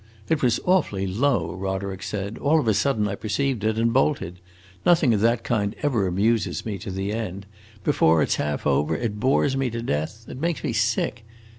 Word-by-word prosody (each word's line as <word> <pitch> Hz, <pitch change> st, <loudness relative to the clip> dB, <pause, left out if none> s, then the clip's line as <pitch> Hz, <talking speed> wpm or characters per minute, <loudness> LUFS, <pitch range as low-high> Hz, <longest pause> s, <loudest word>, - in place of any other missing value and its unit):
"It 160 Hz, -, +1 dB
was 120 Hz, -3 st, +2 dB
awfully 155 Hz, -, +2 dB
low," 100 Hz, -, 0 dB
Roderick 95 Hz, 0 st, -4 dB
said; 100 Hz, +1 st, -4 dB
"all 155 Hz, +3 st, +3 dB
of 145 Hz, -, -2 dB
a 110 Hz, -, +4 dB
sudden 105 Hz, 0 st, +1 dB
I 100 Hz, -, -3 dB
perceived 110 Hz, +3 st, -1 dB
it, 110 Hz, 0 st, +1 dB
and 115 Hz, 0 st, +2 dB
bolted. 130 Hz, -, 0 dB, 0.4 s
Nothing 165 Hz, -8 st, +4 dB
of 105 Hz, -, +1 dB
that 115 Hz, +1 st, +2 dB
kind 105 Hz, -4 st, -1 dB
ever 120 Hz, -10 st, +1 dB
amuses 105 Hz, +5 st, 0 dB
me 105 Hz, -4 st, -4 dB
to 95 Hz, -, -7 dB
the 95 Hz, +2 st, -3 dB
end: 100 Hz, -3 st, -4 dB, 0.4 s
before 80 Hz, -1 st, +3 dB
it -, -, -2 dB
's -, -, +4 dB
half 75 Hz, 0 st, -2 dB
over 75 Hz, +1 st, +2 dB
it 105 Hz, -3 st, -3 dB
bores 135 Hz, +3 st, +2 dB
me 135 Hz, -1 st, 0 dB
to 115 Hz, 0 st, -4 dB
death; 105 Hz, +6 st, -3 dB
it 130 Hz, -, -8 dB
makes 170 Hz, 0 st, -1 dB
me 140 Hz, -6 st, -1 dB
sick. 115 Hz, +1 st, 0 dB
110 Hz, 200 wpm, -24 LUFS, 95-125 Hz, 0.4 s, a